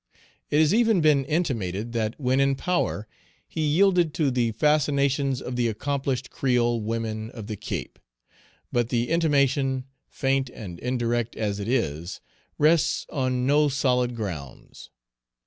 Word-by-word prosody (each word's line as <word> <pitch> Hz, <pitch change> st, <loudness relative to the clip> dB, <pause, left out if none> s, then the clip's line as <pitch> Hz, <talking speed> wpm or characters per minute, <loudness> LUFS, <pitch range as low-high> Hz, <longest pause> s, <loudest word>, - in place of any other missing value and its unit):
It 145 Hz, -, +1 dB
has 155 Hz, +2 st, +4 dB
even 225 Hz, -3 st, +4 dB
been 150 Hz, -3 st, +4 dB
intimated 120 Hz, -, -1 dB
that 110 Hz, +1 st, -2 dB
when 130 Hz, -1 st, +1 dB
in 135 Hz, 0 st, +3 dB
power 135 Hz, -, -1 dB, 0.4 s
he 160 Hz, -, -4 dB
yielded 170 Hz, +1 st, +3 dB
to 150 Hz, -4 st, +1 dB
the 120 Hz, -2 st, +1 dB
fascinations 140 Hz, -1 st, +2 dB
of 125 Hz, -, -5 dB
the 120 Hz, -1 st, +1 dB
accomplished 135 Hz, +2 st, -2 dB
creole 120 Hz, -3 st, +1 dB
women 110 Hz, 0 st, -3 dB
of 115 Hz, -4 st, -9 dB
the 110 Hz, -, -5 dB
Cape. -, -, -6 dB, 0.7 s
But 120 Hz, -1 st, 0 dB
the 120 Hz, -1 st, 0 dB
intimation, 140 Hz, -5 st, +2 dB, 0.2 s
faint 135 Hz, -1 st, 0 dB
and 90 Hz, -8 st, -9 dB
indirect 120 Hz, -2 st, -1 dB
as 105 Hz, -2 st, -2 dB
it 100 Hz, -, -4 dB
is, 85 Hz, -, -1 dB, 0.4 s
rests 155 Hz, +2 st, +3 dB
on 130 Hz, -2 st, 0 dB
no 145 Hz, +2 st, +4 dB
solid 125 Hz, -3 st, +1 dB
grounds. 90 Hz, -11 st, -7 dB
130 Hz, 140 wpm, -25 LUFS, 115-145 Hz, 0.7 s, has